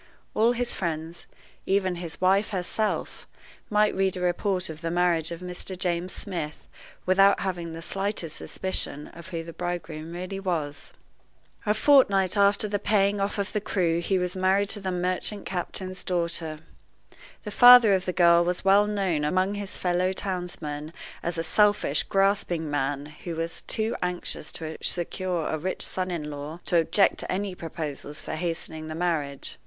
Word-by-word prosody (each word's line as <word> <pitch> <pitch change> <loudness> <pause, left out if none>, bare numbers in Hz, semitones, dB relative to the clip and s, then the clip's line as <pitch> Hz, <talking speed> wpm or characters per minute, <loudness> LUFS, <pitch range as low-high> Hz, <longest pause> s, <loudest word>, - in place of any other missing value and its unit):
All 230 +3 +3
his 245 0 -1
friends, 165 -1 -4 0.4
even 190 -2 +1
his 170 -2 -6
wife 195 +3 +3
herself, 205 +2 -2 0.4
might 210 0 +3
read 190 -1 0
a - - -5
report 180 +1 0
of 160 0 -8
the 165 - -2
marriage 175 -2 +1
of 170 0 -7
Mr. 180 +1 -6
James 180 0 -1
Smith 170 -7 -5 0.4
without 195 +2 +5
having 175 -3 -3
the 165 0 -7
slightest 195 -4 -2
suspicion 170 -5 -2
of 170 0 -12
who 165 -3 -4
the 165 0 -9
bridegroom 170 -3 -5
really 185 +2 -5
was. 160 -7 -3 0.8
A 210 - +3
fortnight 210 -8 +5
after 200 +1 +3
the 205 0 -1
paying 200 -1 +2
off 200 +2 -1
of 200 -1 -2
the 210 - 0
crew 170 -5 +1
he 190 +3 0
was 180 0 -1
married 190 +2 +2
to 210 - 0
the 190 -2 -3
merchant 180 +3 -1
captain's 185 +1 -4
daughter. 170 -3 -2 0.8
The 210 - -6
father 245 -2 +9
of 190 -1 +1
the 180 - 0
girl 170 -1 +5
was 180 +2 -1
well 200 +2 +5
known 190 -7 0
among 185 +6 +1
his 205 -1 -5
fellow 180 +1 +1
townsmen 170 -6 -4 0.3
as 170 0 -3
a 165 - -1
selfish, 205 -4 +3
grasping 195 -5 +1
man, 145 0 -1
who 155 +3 -7
was 165 +1 -3
too 220 0 -1
anxious 180 -3 -2
to 160 -1 -6
secure 175 -1 -1
a 155 - -2
rich 185 +5 -3
son 185 0 -2
in 155 -4 -4
law 145 +3 -7
to 175 - +2
object 180 +4 +3
to - - -4
any 195 +1 -2
proposals 155 -3 -6
for - - -6
hastening 160 -1 -3
the 155 - -5
marriage. 155 -5 -2
180 Hz, 170 wpm, -26 LUFS, 165-195 Hz, 0.8 s, father